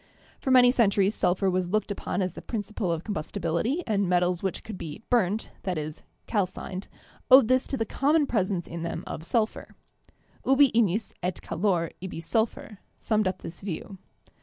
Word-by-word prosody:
For - - -3
many 250 -1 +7
centuries 200 -4 +3
sulphur 190 -1 +1
was 185 -1 0
looked 215 +1 0
upon 195 -1 -2
as 185 - -2
the - - -8
principle 210 -5 -3
of 165 0 -2
combustibility 200 - -2
and 200 -4 +1
metals 180 -1 +2
which 190 -2 -3
could 220 - -7
be 165 +4 -7
"burnt" 215 -3 +1
— - - -31
i.e., 155 -5 -2 0.3
calcined 190 -2 -2 0.2
— - - -29
owed 260 -3 +9
this 255 0 +3
to 270 - -2
the 225 - 0
common 295 +6 +2
pres 210 -8 0
ence 180 -4 -2
in 170 0 -6
them 170 - -4
of 160 - -6
sulphur 220 +5 -1 0.7
(Freund). 270 +1 +2
"Ubi 280 -3 +7
ignis 215 -1 +2
et 180 0 -2
calor, 175 -2 0
ibi 185 -3 -5
sulphur," 215 +2 -1 0.2
summed 215 -3 +1
up 185 0 -3
this 170 - -8
view. 190 +1 -6
200 Hz, 185 wpm, -27 LUFS, 180-225 Hz, 0.7 s, owed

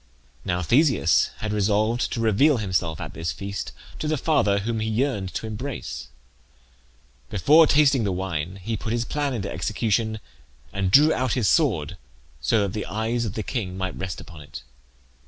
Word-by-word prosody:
Now 90 0 -1
Theseus 120 - +3
had 110 -1 -2
resolved 105 +3 +1
to 120 - -3
reveal 120 +7 +4
himself 90 -6 -1
at - - -6
this 80 +1 -3
feast 100 0 -5 0.3
to 155 - -2
the 155 0 +1
father 130 -9 +2
whom 115 +2 -2
he 110 0 -1
yearned 110 -5 -1
to - - -3
embrace. 110 - -5 1.2
Before 150 - +5
tasting 140 -4 +4
the 100 - 0
wine 90 -2 -3
he 115 +3 -2
put 110 +1 -3
his 120 0 0
plan 145 -2 -1
into 100 -3 -4
execution, 110 0 -1 0.5
and 95 -1 0
drew 150 +10 +6
out 130 -3 0
his 120 -6 +1
sword 95 - +2 0.4
so 110 - +2
that 100 -2 -1
the 105 - -4
eyes 115 +3 -1
of 105 - -4
the 110 - -2
king 95 -6 -4
might 95 -1 -3
rest 95 -4 -5
upon 85 -4 -11
it. 75 -1 -10
110 Hz, 175 wpm, -24 LUFS, 95-125 Hz, 1.2 s, drew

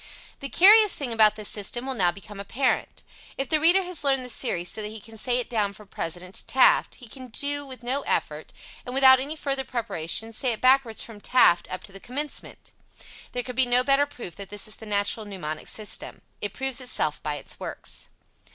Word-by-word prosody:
The 275 - -4
curious 420 +5 +7
thing 265 -6 -3
about 215 -1 +5
this 215 -1 -3
system 220 +4 -1
will 265 - -1
now 180 -7 +2
become 200 +2 -11
apparent. 250 +6 -1 0.3
If 270 -1 -3
the 310 - +3
reader 350 +5 +5
has 355 -4 -4
learned 270 -2 +1
the - - -8
series 180 -9 -1
so 220 - -5
that 210 - -3
he 220 +1 -8
can 225 +2 -14
say 245 +3 0
it 250 - -2
down 210 -4 -1
from 210 0 -15
President 180 +3 -5
to 225 - -2
Taft, 260 - +4
he 245 - -13
can 255 +2 -11 0.4
with 260 -2 -10
no 260 +4 -1
effort, - - -2 0.3
and 250 0 -7
without 260 -1 +7
any 285 +4 -4
further 275 -3 -2
preparation, 225 -3 -1
say 250 +1 0
it 220 - -6
backwards 255 -3 +3
from 215 -3 -11
Taft 175 -9 +4
up 185 - -5
to - - -9
the 195 - -11
commencement! 280 +8 -5 0.6
There 245 - -2
could 250 0 -7
be 260 -1 +4
no 245 +1 +4
better 275 +2 +3
proof 235 - -9
that 200 -1 -8
this 205 0 -4
is 215 - -8
the 220 - -11
natural 205 +1 -1
mnemonic 155 -6 -6
system. 215 -1 -5 0.2
It 205 - -2
proves 265 +2 0
itself 155 -12 -1
by 150 -1 -3
its 145 - -8
works. - - -7
240 Hz, 215 wpm, -25 LUFS, 205-265 Hz, 0.6 s, curious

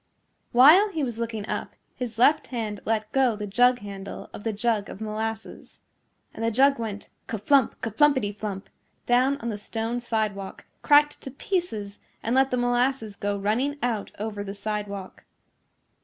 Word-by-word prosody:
While 310 - +7
he 320 -6 -2
was 240 -3 -3
looking 225 -3 -3
up - - -4 0.2
his 240 -3 -6
left 295 +6 +4
hand 220 -5 -4
let 215 -1 -1
go 260 -4 +3
the 210 0 -5
jug 245 +5 +4
handle 200 -1 -8
of - - -9
the 225 - 0
jug 215 -1 -1
of - - -9
molasses. 220 +1 -5 0.5
And 225 - -6
the 230 - +2
jug 275 +4 +4
went 210 -3 -5 0.2
ka 225 - -3
flump, 260 +5 +2
ka 225 - -3
flumpety 260 -5 +2
flump 205 -2 -5 0.4
down 255 +3 +3
on 235 - -3
the 210 - -3
stone 225 +3 -3
sidewalk, 215 -5 -3 0.2
cracked 295 0 +4
to - - -6
pieces 260 - -3 0.2
and 230 - 0
let 265 +1 +4
the 250 - 0
molasses 245 -2 0
go 205 0 -2
running 235 +9 0
out 225 -4 -1
over 210 -1 -4
the 200 0 -6
sidewalk. 200 -2 -5
225 Hz, 170 wpm, -26 LUFS, 210-255 Hz, 0.5 s, While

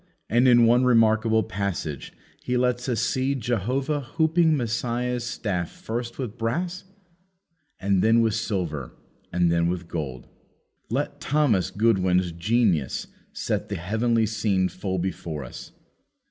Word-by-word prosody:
And 120 +3 +4
in 120 -1 +6
one 120 +2 +4
remarkable 110 -2 +4
passage 95 - -4 0.3
he 125 - -1
lets 125 0 0
us 115 -3 0
see 130 +3 0
Jehovah 130 +5 -1
hooping 160 +4 +2
Messiah's 120 +1 -1
staff 100 -8 -2
first 120 +1 -5
with 120 -4 -5
brass, 170 +12 -2 0.9
and 95 -1 +2
then 115 +1 +4
with 110 -2 +2
silver, 90 - -3 0.4
and 90 -1 +2
then 85 0 +2
with 85 -1 -3
gold. 70 -8 -5 0.6
Let - - -2
Thomas 135 - +2
Goodwin's 95 -5 +2
genius 85 - +1 0.3
set - - -3
the - - -2
heavenly 110 +5 +1
scene 105 -4 0
full 95 0 -3
before 85 -5 -4
us. 60 - -10
110 Hz, 130 wpm, -25 LUFS, 90-125 Hz, 0.9 s, in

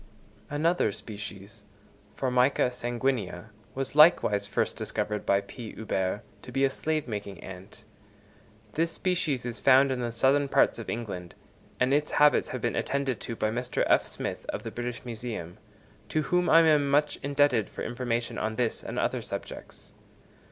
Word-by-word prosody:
Another 155 -4 +1
species, 105 0 -9 0.5
Formica 125 0 +2
sanguinea, 120 -5 -2 0.2
was 135 0 -3
likewise 140 - +5
first - - -1
discovered 105 -1 -3
by 100 0 +4
P. 110 +3 -9
Huber 95 -2 -2 0.2
to 125 - -10
be 135 +2 +1
a 135 - +1
slave 155 +1 -2
making 100 -4 -5
ant. 95 +2 -11 0.9
This 165 +1 +1
species 170 -10 -1
is 120 -1 -4
found 135 +1 +5
in 130 - -1
the 120 -1 -2
southern 135 +4 +3
parts 135 - +3
of 115 - -7
England, 100 -7 -5 0.4
and 130 +2 +3
its 150 +1 +1
habits 150 0 +5
have - - -4
been - - -1
attended 140 -3 -1
to 115 - -5
by 110 -1 0
Mr. 125 +2 -1
F. - - +5
Smith, - - -5
of 105 - -3
the 115 - -5
British 120 +1 -5
Museum, 110 -6 -6 0.5
to 155 - 0
whom 180 +3 +1
I 165 - +8
am 150 -3 +4
much 145 +2 +2
indebted 140 -6 +2
for - - -6
information 120 -1 -2
on 110 0 -2
this 120 -1 0
and - - -6
other - - 0
subjects. - - -8
125 Hz, 160 wpm, -28 LUFS, 110-140 Hz, 0.9 s, I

